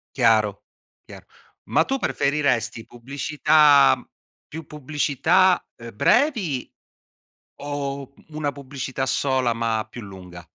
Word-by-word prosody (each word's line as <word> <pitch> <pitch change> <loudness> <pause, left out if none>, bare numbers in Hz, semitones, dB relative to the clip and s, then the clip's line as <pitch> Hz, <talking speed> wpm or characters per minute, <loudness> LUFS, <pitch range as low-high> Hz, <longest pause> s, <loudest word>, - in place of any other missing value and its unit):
Chiaro, 110 -5 +2 0.4
chiaro. - - -13 0.4
Ma 160 - +2
tu 270 - -1
preferiresti, 130 - -1
pubblicità 140 - +3 0.5
più 160 0 -9
pubblicità, 150 +5 +1
uhm, 115 -3 -11
brevi 205 - +1 0.9
o, 140 -1 -5
mhmm, - - -24
una 145 -2 -2
pubblicità 135 -1 -5
sola, 130 -2 0
ma 115 -1 -2
più 120 - -9
lunga? 90 -3 -11
135 Hz, 100 wpm, -23 LUFS, 115-150 Hz, 0.9 s, pubblicità